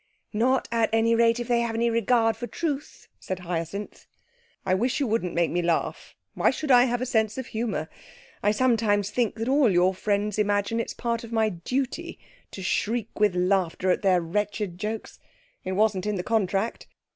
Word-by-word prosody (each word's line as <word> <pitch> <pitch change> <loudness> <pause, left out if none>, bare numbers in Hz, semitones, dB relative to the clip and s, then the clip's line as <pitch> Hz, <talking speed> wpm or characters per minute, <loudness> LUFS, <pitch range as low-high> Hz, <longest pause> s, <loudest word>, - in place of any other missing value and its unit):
'Not, 250 +5 +2
at 230 -1 +2
any 225 +1 +3
rate, 230 0 +3
if 240 - -4
they 240 -1 +2
have 230 -1 -2
any 235 +1 +1
regard 230 0 +2
for 240 +2 -6
truth,' 295 +3 -4
said 185 - -4
Hyacinth. 175 +3 -5 0.6
'I 185 - +2
wish 245 +9 +1
you 280 - +1
wouldn't 220 -6 -1
make 170 -1 +2
me 175 - 0
laugh. 170 -1 -2 0.2
Why - - +3
should 300 -3 -2
I 245 0 +7
have 245 -1 -1
a - - -1
sense 220 -3 0
of 260 - -4
humour? 220 -9 -3 0.5
I 205 - +2
sometimes 210 -3 +2
think 240 -4 0
that 225 0 -4
all 270 -2 +4
your 180 0 +3
friends 205 +2 -1
imagine 205 +2 +1
it's 230 - -3
part 235 -1 -2
of 230 - -9
my 220 -1 +2
duty 260 - -3 0.3
to 190 - -8
shriek 225 +4 -1
with 205 -3 +3
laughter 185 0 +1
at - - 0
their 185 -3 +3
wretched 205 +1 -2
jokes. 215 +2 -5 0.4
It 185 - -3
wasn't 205 -1 +1
in 210 - 0
the 180 - -3
contract. 215 0 -1
220 Hz, 190 wpm, -26 LUFS, 190-235 Hz, 0.6 s, I